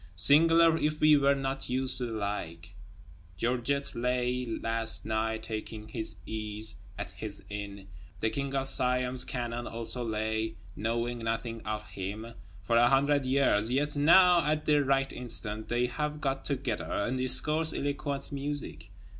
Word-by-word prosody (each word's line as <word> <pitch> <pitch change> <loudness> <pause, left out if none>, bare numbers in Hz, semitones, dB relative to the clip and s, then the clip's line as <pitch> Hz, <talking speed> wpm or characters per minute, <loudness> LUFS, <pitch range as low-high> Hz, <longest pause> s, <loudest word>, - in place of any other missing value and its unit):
Singular 165 - +6
(if 155 0 -1
we 155 0 +6
were 140 -1 +3
not 135 -1 -3
used 130 +1 +1
to 125 - -2
the - - -7
like). 100 -3 -5 0.6
Georget 125 +6 -1
lay, 125 0 -1
last 115 0 0
night, 110 0 -2
taking 110 -1 -6
his 110 -2 -2
ease 110 -1 -3 0.2
at 100 -3 -6
his 100 +3 -6
inn; 100 -1 -7 0.3
the 110 +1 0
King 140 -1 -3
of 135 0 -1
Siam's 125 -1 +3
cannon 120 -1 -4
also 115 +2 -3
lay, 110 0 -2 0.2
knowing 120 +2 -2
nothing 115 0 -3
of 105 0 -3
him, 100 +4 -7 0.3
for 115 +5 +1
a 120 +1 +5
hundred 140 +1 +2
years; 125 -5 +2
yet 145 +3 +1
now, 175 +4 +6
at 150 0 -1
the 150 -1 +3
right 135 0 0
instant, 110 -3 -1
they 120 +1 +1
have 150 +4 -3
got 135 -2 -2
together, 130 -6 -2
and 120 +5 -1
discourse 150 +5 +4
eloquent 140 0 -3
music. 140 - -5
125 Hz, 150 wpm, -29 LUFS, 110-140 Hz, 0.6 s, Singular